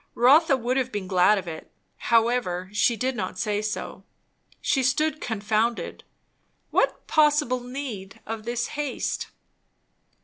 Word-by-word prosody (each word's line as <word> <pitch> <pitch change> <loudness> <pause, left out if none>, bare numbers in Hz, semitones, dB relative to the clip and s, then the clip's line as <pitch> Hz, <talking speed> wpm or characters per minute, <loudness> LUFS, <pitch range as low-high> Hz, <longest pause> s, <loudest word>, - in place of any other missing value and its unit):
Rotha 275 +4 +5
would 250 +1 -1
have 260 -1 0
been 205 -2 -3
glad 185 +2 +4
of 190 - -5
it; 160 -1 -7 0.3
however, 225 -6 +1
she 230 +3 +3
did 260 +2 -1
not - - -4
say 210 -2 -1
so. 215 0 -5 0.6
She 270 - +1
stood 305 +5 +1
confounded. 220 +1 -1 0.7
What - - +1
possible 295 -4 +3
need 245 -6 -7
of 225 -1 -5
this 235 +1 -2
haste? 290 -2 -3
240 Hz, 130 wpm, -25 LUFS, 210-260 Hz, 0.7 s, Rotha